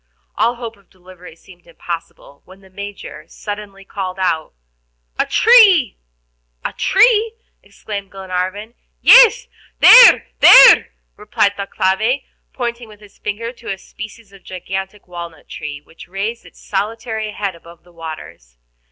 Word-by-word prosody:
All 230 Hz, +3 st, 0 dB
hope 235 Hz, -2 st, -9 dB
of 200 Hz, -2 st, -29 dB
delivery 180 Hz, -2 st, -16 dB
seemed 175 Hz, +1 st, -20 dB
impossible, 165 Hz, -4 st, -9 dB
when 190 Hz, +1 st, -18 dB
the 190 Hz, -1 st, -21 dB
Major 200 Hz, -6 st, -10 dB
suddenly 205 Hz, 0 st, -9 dB
called 190 Hz, -2 st, -6 dB
out: 170 Hz, -4 st, -2 dB, 0.7 s
"A -, -, 0 dB
tree!" 405 Hz, -, +4 dB, 0.7 s
"A -, -, -4 dB
tree?" 445 Hz, +2 st, +2 dB, 0.3 s
exclaimed 200 Hz, -2 st, -9 dB
Glenarvan. 190 Hz, +3 st, -5 dB, 0.3 s
"Yes, 485 Hz, -1 st, +6 dB, 0.3 s
there, 485 Hz, +1 st, +8 dB
there!" -, -, +8 dB, 0.3 s
replied 210 Hz, -1 st, -1 dB
Thalcave, 200 Hz, +6 st, -1 dB, 0.3 s
pointing 240 Hz, -2 st, -5 dB
with 210 Hz, -1 st, -17 dB
his 205 Hz, -1 st, -20 dB
finger 225 Hz, +3 st, -5 dB
to 235 Hz, -, -9 dB
a 195 Hz, -, -5 dB
species 215 Hz, +1 st, -12 dB
of 195 Hz, -, -17 dB
gigantic 190 Hz, +2 st, -7 dB
walnut 170 Hz, -3 st, -10 dB
tree, 145 Hz, -2 st, -8 dB
which 165 Hz, +2 st, -16 dB
raised 200 Hz, +6 st, -5 dB
its -, -, -20 dB
solitary 220 Hz, +2 st, -4 dB
head 200 Hz, -2 st, -4 dB
above 170 Hz, 0 st, -17 dB
the 175 Hz, 0 st, -23 dB
waters. 85 Hz, -, -11 dB
200 Hz, 135 wpm, -17 LUFS, 180-225 Hz, 0.7 s, there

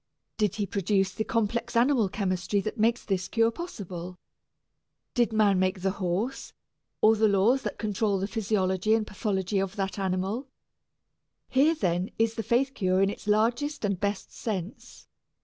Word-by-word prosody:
Did 210 Hz, -4 st, +1 dB
he 210 Hz, -, -1 dB
produce 195 Hz, -1 st, 0 dB
the 220 Hz, -, -2 dB
complex 230 Hz, +1 st, -1 dB
animal 235 Hz, -3 st, +3 dB
chemistry 185 Hz, 0 st, -1 dB
that 215 Hz, +3 st, -5 dB
makes 230 Hz, +2 st, +2 dB
this 190 Hz, -2 st, -1 dB
cure 230 Hz, 0 st, +2 dB
possible? 185 Hz, -, -7 dB, 1.0 s
Did 240 Hz, -3 st, +2 dB
man 210 Hz, -3 st, +3 dB
make 185 Hz, 0 st, 0 dB
the 190 Hz, +1 st, +1 dB
horse, 190 Hz, +9 st, -2 dB, 0.5 s
or 220 Hz, +1 st, +6 dB
the 220 Hz, 0 st, +3 dB
laws 210 Hz, +6 st, +3 dB
that -, -, -4 dB
control 210 Hz, -1 st, 0 dB
the 190 Hz, -, -1 dB
physiology 205 Hz, -1 st, +1 dB
and 220 Hz, -1 st, 0 dB
pathology 195 Hz, -1 st, -1 dB
of 195 Hz, 0 st, -2 dB
that 195 Hz, 0 st, -3 dB
animal? 195 Hz, +7 st, -1 dB, 1.0 s
Here, 295 Hz, +5 st, +4 dB
then, 180 Hz, -, 0 dB
is 225 Hz, 0 st, +2 dB
faith 235 Hz, +5 st, 0 dB
cure 185 Hz, -3 st, +2 dB
in 195 Hz, -, +2 dB
its -, -, -10 dB
largest 230 Hz, +6 st, +1 dB
and 200 Hz, -3 st, -1 dB
best 200 Hz, 0 st, -3 dB
sense. 195 Hz, -4 st, -6 dB
205 Hz, 155 wpm, -27 LUFS, 190-225 Hz, 1.0 s, or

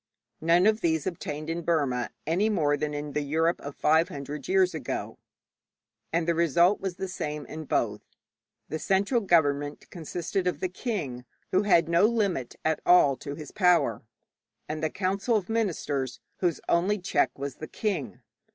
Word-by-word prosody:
None 170 Hz, +3 st, +4 dB
of 220 Hz, +1 st, +3 dB
these 160 Hz, -3 st, +1 dB
obtained 155 Hz, -4 st, -4 dB
in 165 Hz, +1 st, -2 dB
Burma 140 Hz, -8 st, 0 dB, 0.2 s
any 185 Hz, +7 st, +2 dB
more 150 Hz, -8 st, +2 dB
than 150 Hz, 0 st, -3 dB
in 145 Hz, 0 st, -5 dB
the 150 Hz, -, 0 dB
Europe 160 Hz, +4 st, +1 dB
of 140 Hz, 0 st, -7 dB
five 160 Hz, +2 st, +3 dB
hundred 145 Hz, +1 st, -6 dB
years 375 Hz, 0 st, +3 dB
ago, -, -, -4 dB, 0.9 s
and 165 Hz, 0 st, 0 dB
the 170 Hz, -, +3 dB
result 170 Hz, +4 st, +3 dB
was 190 Hz, -2 st, -3 dB
the 190 Hz, -, -4 dB
same 150 Hz, -5 st, -4 dB
in 155 Hz, 0 st, -7 dB
both. 105 Hz, -6 st, 0 dB, 0.7 s
The 160 Hz, -, -4 dB
central 200 Hz, +8 st, +2 dB
government 145 Hz, -6 st, +1 dB
consisted 175 Hz, +2 st, -3 dB
of 180 Hz, -, -1 dB
the 185 Hz, -, -1 dB
king, 175 Hz, -, -4 dB, 0.3 s
who 185 Hz, -, +4 dB
had 175 Hz, -5 st, +4 dB
no 170 Hz, +4 st, +4 dB
limit 200 Hz, -, -1 dB
at 160 Hz, -1 st, +1 dB
all 175 Hz, -6 st, +6 dB
to 140 Hz, 0 st, -6 dB
his 155 Hz, -1 st, -9 dB
power, 180 Hz, -, +3 dB, 0.7 s
and 155 Hz, 0 st, -4 dB
the 155 Hz, -, +1 dB
council 195 Hz, +6 st, 0 dB
of 200 Hz, -2 st, -1 dB
ministers, 150 Hz, -, -1 dB, 0.2 s
whose 175 Hz, -4 st, 0 dB
only 185 Hz, +5 st, +2 dB
check 175 Hz, -9 st, 0 dB
was 140 Hz, -2 st, -5 dB
the 155 Hz, -, -7 dB
king. 150 Hz, -, -3 dB
165 Hz, 170 wpm, -27 LUFS, 145-185 Hz, 0.9 s, all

